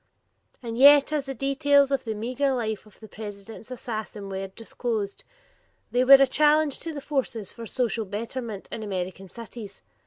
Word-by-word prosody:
And 230 Hz, 0 st, -4 dB
yet 285 Hz, +2 st, +7 dB
as 285 Hz, -2 st, -1 dB
the 270 Hz, -, -4 dB
details 280 Hz, +1 st, +3 dB
of 275 Hz, -, 0 dB
the 220 Hz, -1 st, -3 dB
meager 255 Hz, +5 st, 0 dB
life 220 Hz, -3 st, -3 dB
of 210 Hz, -, -20 dB
the 220 Hz, -, -11 dB
President's 210 Hz, +2 st, -9 dB
assassin 220 Hz, -4 st, -6 dB
were 195 Hz, 0 st, -4 dB
disclosed, 220 Hz, 0 st, -4 dB, 0.7 s
they 250 Hz, +1 st, +3 dB
were 265 Hz, +2 st, +8 dB
a 275 Hz, 0 st, +6 dB
challenge 300 Hz, +2 st, +3 dB
to 330 Hz, -, -5 dB
the 290 Hz, -2 st, -6 dB
forces 260 Hz, -8 st, -2 dB
for 230 Hz, -1 st, -9 dB
social 235 Hz, -2 st, -1 dB
betterment 220 Hz, +1 st, -5 dB
in -, -, -5 dB
American 190 Hz, -2 st, -4 dB
cities. 225 Hz, 0 st, -10 dB
235 Hz, 165 wpm, -26 LUFS, 210-275 Hz, 0.7 s, were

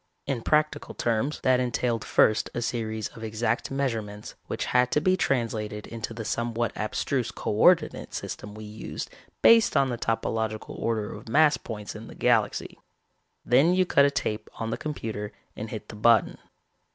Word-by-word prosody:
In 135 Hz, -4 st, -2 dB
practical 155 Hz, +4 st, +1 dB
terms, 120 Hz, +6 st, 0 dB
that 130 Hz, -1 st, +3 dB
entailed 120 Hz, -2 st, 0 dB
first 110 Hz, -, +3 dB
a 120 Hz, -, -1 dB
series 110 Hz, -3 st, -2 dB
of 115 Hz, -, -11 dB
exact 110 Hz, +2 st, -1 dB
measurements 115 Hz, -7 st, -3 dB
which -, -, -3 dB
had 125 Hz, 0 st, +4 dB
to -, -, +4 dB
be 185 Hz, +4 st, +3 dB
translated 110 Hz, -, -1 dB
into 115 Hz, -1 st, -6 dB
the 115 Hz, -1 st, -6 dB
somewhat 115 Hz, +1 st, -1 dB
abstruse 120 Hz, +3 st, -1 dB
co -, -, -4 dB
ordinate 155 Hz, -, +3 dB
system 105 Hz, 0 st, -6 dB
we 110 Hz, -, -8 dB
used 105 Hz, +1 st, -6 dB, 0.3 s
based 230 Hz, -6 st, +6 dB
on 135 Hz, -1 st, +3 dB
the 120 Hz, -2 st, -3 dB
topological 110 Hz, -1 st, -2 dB
order 110 Hz, -2 st, -1 dB
of -, -, -10 dB
mass 150 Hz, +3 st, +5 dB
points 105 Hz, -4 st, -7 dB
in 110 Hz, +1 st, -9 dB
the -, -, -11 dB
galaxy. 115 Hz, -4 st, +1 dB, 0.7 s
Then 140 Hz, +9 st, +4 dB
you 185 Hz, 0 st, +3 dB
cut 140 Hz, -5 st, +5 dB
a -, -, +4 dB
tape 110 Hz, -6 st, -3 dB
on 115 Hz, 0 st, -3 dB
the -, -, 0 dB
computer 110 Hz, -8 st, -5 dB, 0.2 s
and 110 Hz, +1 st, -6 dB
hit 110 Hz, -, -7 dB
the -, -, -8 dB
button. 115 Hz, +2 st, +3 dB
115 Hz, 170 wpm, -27 LUFS, 110-135 Hz, 0.7 s, based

